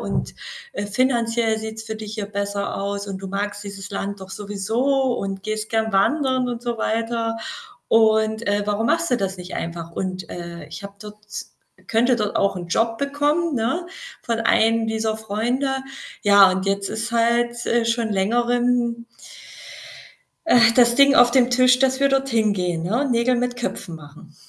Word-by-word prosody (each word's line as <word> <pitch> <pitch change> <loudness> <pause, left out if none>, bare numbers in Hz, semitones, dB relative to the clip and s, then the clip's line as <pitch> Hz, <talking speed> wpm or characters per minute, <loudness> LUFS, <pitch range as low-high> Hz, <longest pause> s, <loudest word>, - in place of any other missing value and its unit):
und, - - -3 0.4
äh, 205 - -4
finanziell 230 -1 +1
sieht's 220 0 -6
für 220 -1 -6
dich 215 0 -7
hier 210 -3 -4
besser 200 0 -3
aus 200 +1 -3
und 195 -1 -5
du 195 - -6
magst 205 +1 -3
dieses 195 -1 -8
Land 200 0 -4
doch 190 - -11
sowieso 225 +7 0
und 195 -1 -4
gehst 215 +1 -3
gerne 220 -1 0
wandern 260 +4 +2
und 240 -1 -4
so 240 -2 -3
weiter 225 0 -1 0.5
und, 220 0 +3
äh, 205 0 +1
warum 210 +2 0
machst 335 +5 +1
du 245 - +2
das 195 -1 -2
nicht 180 0 -8
einfach?“ 170 0 -5
Und, 185 0 -4
äh, 170 -1 -7
ich - - -9
habe 200 0 -9
dort 210 0 -10 0.7
könnte 240 +3 +3
dort 210 -2 -2
auch 200 - +2
'n 175 -1 -6
Job 225 +5 0
bekommen, 290 +3 0
ne, 260 +10 -1 0.4
von 230 -1 -2
einem 225 0 +3
dieser 220 0 -1
Freunde. 225 +6 -1 0.5
Ja, 200 -2 +7
und 190 0 -2
jetzt 195 0 0
ist 220 +1 -3
halt, 235 +1 +1
äh, 235 -1 +2
schon 230 -1 0
längerem 235 +3 +1 1.4
äh, 240 -6 +6
das 240 -1 +5
Ding 280 0 +6
auf 245 -2 +6
dem 250 -1 +3
Tisch, 255 0 +5
dass 265 0 +1
wir 275 - +4
dort 270 0 +1
hingehen, 200 -8 0
ne, 235 +11 0
Nägel 245 +1 +2
mit 245 0 -1
Köpfen 220 -8 -4
machen. 155 +1 -14
225 Hz, 170 wpm, -22 LUFS, 200-240 Hz, 1.4 s, Ja